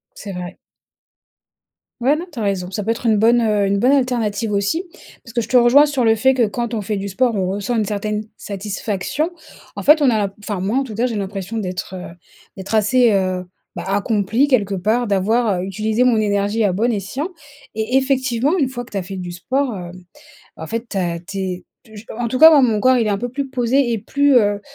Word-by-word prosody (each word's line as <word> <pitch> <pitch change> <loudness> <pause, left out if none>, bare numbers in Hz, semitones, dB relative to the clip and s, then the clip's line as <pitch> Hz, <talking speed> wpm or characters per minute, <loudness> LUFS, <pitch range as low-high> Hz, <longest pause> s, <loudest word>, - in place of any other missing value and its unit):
C'est 200 -2 -8
vrai. 180 0 -7 1.4
Ouais, 265 +5 +3
non 330 +4 -5
tu 255 - -9
as 225 - -2
raison. 190 -3 -2
Ça 205 +1 -4
peut 225 - +1
être 235 +1 -5
une 220 -2 +4
bonne, 235 +3 +4
heu, 210 -2 +1
une 200 +1 +1
bonne 250 +6 +3
alternative 235 -6 0
aussi 200 - 0 0.4
parce 230 - -12
que 240 - 0
je 225 - -5
te 255 - +2
rejoins 250 +5 +6
sur 280 -5 0
le 225 - +5
fait 265 +5 +3
que 245 -4 +2
quand 235 +3 -4
on 215 - -1
fait 205 +1 -3
du 200 +1 -4
sport 235 +4 +1
on 185 -2 -1
ressent 200 +5 -2
une 220 - +1
certaine 210 +1 -2
satisfaction. 205 - -3 0.4
En - - -6
fait 300 +2 +6
on 285 - +4
a 220 -3 +2
l'im 200 -1 -1
enfin, 205 -2 -5
moi, 200 +6 -1
en 275 - 0
tout 220 -5 -8
cas, 240 +4 +1
j'ai 230 -3 -3
l'impression 200 +2 -4
d'être, 185 -1 -5
heu, 180 -2 -9 0.4
d'être 195 +3 -3
assez, 235 +3 +4
heu, 185 -2 0 0.3
bah, 175 - -5
accomplie 205 +5 +1
quelque 205 -8 +1
part 220 +5 0
d'avoir, 205 +1 +1
heu, - - -3
utilisé 215 +5 0
mon 240 -3 +3
énergie 205 +1 0
à 200 -3 +2
bon 230 +6 +1
escient 220 - -3 0.5
et 220 +4 -1
effectivement 265 +3 +1
une 270 -4 +2
fois 245 -2 -6
que 235 - -20
tu - - -5
as - - -2
fait 190 +2 -7
du 180 -1 -6
sport, 255 +8 -2
hem, 180 0 -9 0.5
en 160 - -7
fait 230 +1 -4
ta 175 -5 -2
tu 195 +3 -8
es 185 -1 -4 0.2
t 220 -2 -17
j 210 - -11
en 240 - -1
tout 255 +3 -3
cas, 320 +1 +11
moi, 300 -3 +6
mon 225 -5 +2
corps 255 +2 +4
il 230 -3 +1
est - - +1
un 200 - 0
peu 245 - -3
plus 270 +2 -4
posé 250 0 +1
et 225 - -1
plus, 280 +6 +2
heu, 205 -3 +3
220 Hz, 240 wpm, -19 LUFS, 195-245 Hz, 1.4 s, cas